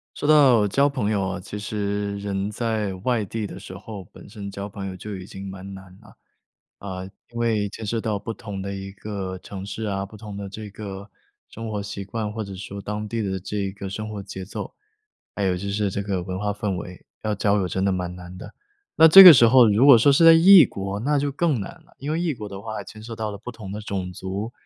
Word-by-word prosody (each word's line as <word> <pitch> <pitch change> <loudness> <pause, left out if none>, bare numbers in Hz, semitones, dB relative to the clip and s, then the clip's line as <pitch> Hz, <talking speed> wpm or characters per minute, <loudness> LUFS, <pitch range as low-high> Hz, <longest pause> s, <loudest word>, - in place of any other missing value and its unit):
说 145 - -3
到 130 -8 +6
交 140 +8 +3
朋 125 -7 -1
友 100 -3 0
啊， 95 +1 -4
其 100 +3 -8
实 100 -1 -3
人 100 0 -2
在 110 -3 -2
外 120 -4 +1
地 105 +2 -4
的 - - -9
时 95 - -9
候， 100 0 -9
本 - - -15
身 100 -1 -7
交 100 +1 -6
朋 100 -1 -7
友 95 - -6
就 105 +2 -7
已 95 -1 -8
经 95 0 -8
蛮 95 +1 -9
难 95 -1 -12
了， - - -19 0.6
啊， 95 -2 -6 0.3
因 120 - -6
为 110 -3 +1
牵 110 - -8
涉 115 +2 -1
到 110 -2 -2
不 115 - -5
同 105 -3 -7
的 100 +1 -4
一 95 0 -6
个 100 -2 -5
城 95 +1 -8
市 100 +3 -5
啊， 100 -2 -2
不 110 - -13
同 105 -2 -9
的 100 0 -6
这 105 +1 -8
个 100 0 -8 0.4
生 115 0 -7
活 105 -1 -3
习 100 -1 -6
惯， 105 +1 -4
或 110 +1 -4
者 100 -1 -8
说 100 +2 -7
当 105 +1 -4
地 115 +2 -2
的 95 -2 -2
这 100 +1 -3
个 100 -1 -7
生 110 +2 -5
活 105 -2 -6
节 95 -1 -8
奏， 95 - -7 0.6
还 105 - -3
有 95 -2 +1
就 100 +3 -5
是 100 0 0
这 100 - -3
个 100 -3 -2
文 90 +1 -5
化 105 +1 -1
氛 100 -2 -2
围， 90 0 -8 0.2
要 110 -1 -1
交 100 0 +1
友 95 -2 -1
真 95 +2 -1
的 100 - +2
蛮 90 -1 -3
难 90 0 -10
的。 - - -10 0.4
那 160 - +8
这 195 +5 +12
个 180 -3 +13
时 120 -5 +7
候 125 0 +7
如 105 +5 +4
果 140 -4 +10
说 130 +6 +5
是 150 +4 +4
在 165 - +11
异 170 -2 +8
国 100 0 -5
那 145 +5 +1
就 140 0 0
更 150 -4 0
难 100 - -5
了， - - -25
因 145 +3 -4
为 160 - -1
异 175 -2 0
国 105 -3 -7
的 100 -1 -8
话 110 0 -6
还 105 -2 -5
牵 110 +2 -12
涉 115 +1 -7
到 110 -1 -3
了 100 - -6
不 115 - -8
同 105 -4 -9
的 105 - -5
种 95 -3 -4
族， 95 +5 -5
100 Hz, 275 characters per minute, -23 LUFS, 95-110 Hz, 0.6 s, 个